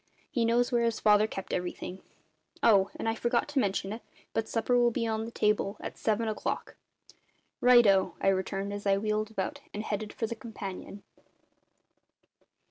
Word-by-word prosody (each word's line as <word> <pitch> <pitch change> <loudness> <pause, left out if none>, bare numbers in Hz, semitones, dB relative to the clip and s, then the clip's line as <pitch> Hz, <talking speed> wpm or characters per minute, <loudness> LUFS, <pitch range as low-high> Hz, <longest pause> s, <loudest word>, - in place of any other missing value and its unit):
He 235 -2 +1
knows 240 +1 +2
where 240 -1 +2
his 230 -1 0
father 210 0 +5
kept 195 -3 -6
everything. 180 +1 -4 0.6
Oh! 200 -4 +5
and - - -4
I 225 - +2
forgot 235 +3 0
to 290 -1 +1
mention 195 -2 -1
it, 225 - -7 0.3
but 225 - 0
supper'll 240 +1 +3
be 235 0 -2
on 220 0 -1
the 230 - -7
table 210 -2 +1
at - - -6
seven 220 +1 0
o'clock." 215 - -3 0.8
"Righto!" 235 -6 +5
I - - +3
returned 195 +1 -1
as 205 0 -4
I 195 0 +4
wheeled 215 +1 -1
about 220 +7 -4
and 210 - -3
headed 210 0 -3
for 225 - -3
the 225 - -3
companion. 205 -4 -8
215 Hz, 165 wpm, -29 LUFS, 200-230 Hz, 0.8 s, father